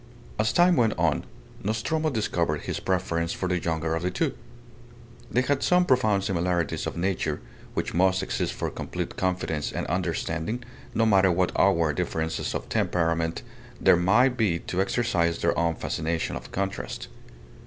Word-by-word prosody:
As 110 +2 +2
time 175 -1 +5
went 115 -3 +2
on, - - +1 0.4
Nostromo 120 +10 0
discovered 85 - 0
his - - -3
preference 85 -3 -1
for 95 - -2
the 90 -1 +1
younger 80 -1 -1
of 80 - -1
the 90 - 0
two. 90 - -1 1.0
They 125 - +2
had 140 +1 +1
some 180 0 +4
profound 110 - +3
similarities 85 -3 0
of - - -5
nature, 85 -4 -1 0.4
which - - -2
must 95 +2 +3
exist - - -1
for - - -3
complete - - -5
confidence 90 -5 -1
and - - -3
understanding, 90 - -2 0.3
no 115 - +3
matter 95 -3 +5
what 90 +1 +1
outward 85 -6 +3
differences 80 -2 -2
of - - -4
temperament 85 -1 0 0.4
there - - +6
may 100 +9 +4
be 110 -9 +1
to 90 - -1
exercise 95 -5 +1
their 85 - +1
own 85 -1 +1
fascination 80 -1 -2
of 60 0 -8
contrast. 95 0 -3
90 Hz, 155 wpm, -26 LUFS, 85-110 Hz, 1.0 s, there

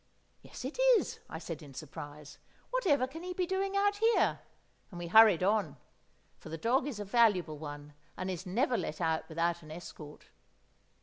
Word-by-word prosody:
"Yes, - - -9
it 280 - -6 0.2
is," - - -4
I - - -5
said 165 -1 -6
in 140 -3 -12
surprise. 145 0 -9 0.3
"Whatever 330 - +2
can 310 +6 -9
he 360 +1 -5
be 365 - 0
doing 390 +2 -1
out 405 0 +2
here?" 450 +2 +3 0.5
and 175 - -10
we 175 - -5
hurried 205 -1 +7
on; 195 -7 +1 0.6
for - - -11
the 165 - -5
dog 255 - +1
is 250 -8 -5
a 205 - -4
valuable 195 -8 +3
one, 145 -1 -8 0.2
and 185 +1 -3
is 180 -1 -5
never 240 +7 +1
let 155 - -4
out 160 -1 -1
without 170 +1 0
an 155 - -13
escort. 155 -2 -10
185 Hz, 180 wpm, -32 LUFS, 160-265 Hz, 0.6 s, hurried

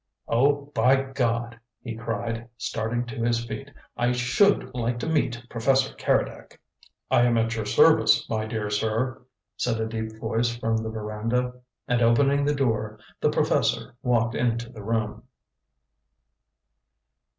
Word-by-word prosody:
"Oh, 140 +4 +2
by 130 -1 +4
God!" 120 -4 -2 0.2
he 120 -3 -5
cried, 115 +1 -4
starting 115 +2 -2
to 120 0 -6
his 115 0 +1
feet; 135 +3 -6 0.3
"I 120 +1 +1
SHOULD 125 +4 +2
like 120 -1 -1
to - - -3
meet 125 -7 0
Professor 130 +3 +1
Keredec!" - - -1 0.5
"I - - +5
am 120 -1 +3
at 115 0 +1
your 110 -2 -3
service, - - +5
my 110 -1 -2
dear 110 -2 -3
sir," 110 +5 -1 0.4
said 115 -2 0
a 110 - 0
deep 110 0 -4
voice 115 +1 0
from 115 -1 0
the 110 0 -3
veranda. 110 +3 -2 0.3
And 120 -1 +1
opening 140 +5 +3
the 145 0 +1
door, 110 -5 -1 0.2
the - - +2
professor - - +1
walked 120 -2 +1
into 120 0 -1
the 110 -4 -10
room. 110 0 -2
115 Hz, 140 wpm, -25 LUFS, 115-125 Hz, 0.5 s, I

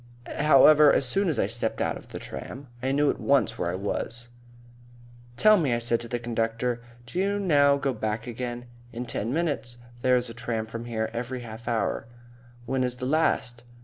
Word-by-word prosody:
However, 150 0 +7
as - - +2
soon 195 +7 +1
as 155 - -1
I - - +2
stepped - - -2
out - - 0
of - - -11
the - - -8
tram, 130 - -8
I 130 +1 0
knew 145 +1 +3
at - - -8
once 135 -5 +2
where 85 - 0
I - - -3
was. 115 +5 -3 1.1
"Tell 215 - +6
me," 135 -8 +1
I - - 0
said 120 0 0
to 120 - -7
the 120 +1 -2
conductor, 115 +1 -2 0.2
"do 150 +9 -4
you 200 +1 +1
now 145 -7 +4
go 140 -1 -1
back 110 0 -3
again?" 120 0 -5 0.3
"In 120 +2 -5
ten 115 -1 -3
minutes. 140 -7 -2 0.2
There's 125 -1 +2
a 115 - -8
tram 120 -2 -3
from 115 +1 -7
here 110 -2 -2
every 125 +2 -4
half 115 0 -10
hour." 115 0 -1 0.6
"When 130 +1 0
is 125 -1 0
the 125 - -5
last?" 130 -5 +1
120 Hz, 195 wpm, -26 LUFS, 115-140 Hz, 1.1 s, However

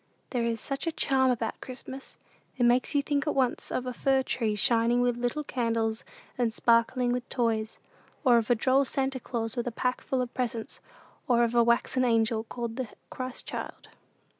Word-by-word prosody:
There 245 - 0
is 230 -1 -1
such 275 +7 -4
a - - +2
charm 265 -4 +2
about 230 -3 -2
Christmas! 260 +1 -7 0.4
It 245 - +1
makes 245 +4 +3
you 285 - +3
think 285 +1 -1
at - - 0
once 260 -3 0
of 255 - -2
a 250 - -3
fir 265 +2 +2
tree 225 -4 -1
shining 235 +1 +3
with 245 -1 +2
little 245 +5 -2
candles 230 -4 -1 0.4
and 235 -2 +2
sparkling 235 +2 +2
with 250 0 -3
toys, 225 -3 0 0.5
or 245 -4 +6
of 225 - -4
a 245 - +5
droll 260 +4 +3
Santa 270 0 -1
Claus 225 -2 -3
with 240 -1 -2
a - - -1
pack 250 +2 -1
full 260 -1 -1
of 245 - -8
presents, 235 -3 -3 0.5
or 240 -1 +4
of 235 0 0
a 235 -1 +5
waxen 235 +2 +2
angel 225 -2 +2
called 235 0 -5
the 260 -2 -2 0.2
Christ 255 -1 -5
child. - - -7
245 Hz, 190 wpm, -28 LUFS, 230-260 Hz, 0.5 s, or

